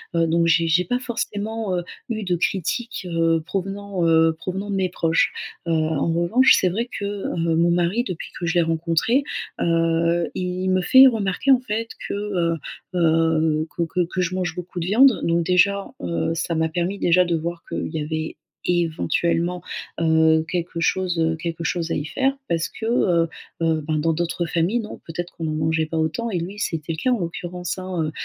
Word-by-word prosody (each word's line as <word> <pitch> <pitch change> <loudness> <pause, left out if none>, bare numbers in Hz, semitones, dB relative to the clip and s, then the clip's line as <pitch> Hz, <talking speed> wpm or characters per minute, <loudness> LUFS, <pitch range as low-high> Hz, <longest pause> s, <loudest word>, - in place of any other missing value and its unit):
Heu, 165 - +3
donc 170 +1 +2
j'ai 165 0 +3
j'ai 175 +3 +3
pas 245 +8 0
forcément, 220 -4 -3
heu, 175 - -2 0.3
eu 220 -2 -2
de 180 -2 0
critiques, 200 +5 -2
heu, 165 -1 +2
provenant, 195 -1 -2
heu, 160 0 +4
provenant 190 +3 -4
de 200 - -1
mes 185 -1 +1
proches. 165 -2 +1 0.3
Heu, - - +1
en 160 0 +1
revanche, 175 +11 +5
c'est 185 - +2
vrai 220 +7 -1
que, 200 - -6
heu, 200 -1 -3 0.2
mon 170 +1 +3
mari 175 +8 +1
depuis 180 - -5
que 175 - -3
je 165 - 0
l'ai 175 - +5
rencontré, 165 - +1 0.4
heu, 165 0 +2
il 185 0 -2
me 185 0 +3
fait 260 +7 +8
remarquer, 220 +2 +1
en 255 - +6
fait, 230 -2 -3 0.2
que, - - -3
heu 195 -5 0 0.4
heu, 160 -1 +2
que 170 - 0
que 180 +2 -1
que 180 +2 -3
je 180 +1 -1
mange 180 -3 -2
beaucoup 180 0 -6
de 165 - -2
viande. 235 +6 +5
Donc 170 0 +1
déjà, 200 +2 +3 0.2
heu, 85 - -1
ça 165 0 -2
m'a 160 0 +1
permis 175 +4 -2
déjà 180 -1 +4
de 170 -1 0
voir 170 +1 -4
qu'il - - -3
y 160 - -3
avait 155 +1 -3 0.3
éventuellement, 170 - 0 0.4
heu, 160 -1 +4
quelque 175 -1 -3
chose, 180 0 0
heu, 160 0 +2
quelque 165 0 -5
chose 170 -1 -1
à - - +1
y 145 - -2
faire. 270 - 0
Parce 165 -1 0
que, 220 - -7
heu 175 -8 +2 0.3
heu, 160 -1 +1
ben, 155 0 0
dans 165 +1 +1
d'autres 170 +1 -1
familles, 170 +8 0
non 215 -2 -7
peut-être 175 +2 -5
qu'on 165 - -7
n'en 155 - -1
mangeait 160 +1 +1
pas 160 +1 -4
autant 160 +9 -1
et 180 -5 -1
lui, 185 +5 -6
c'était 165 -4 -2
le - - -6
cas 255 - +3
en 245 - +1
l'occurrence, 175 +1 -4
hein, 180 -4 -3
170 Hz, 200 wpm, -22 LUFS, 165-190 Hz, 0.4 s, fait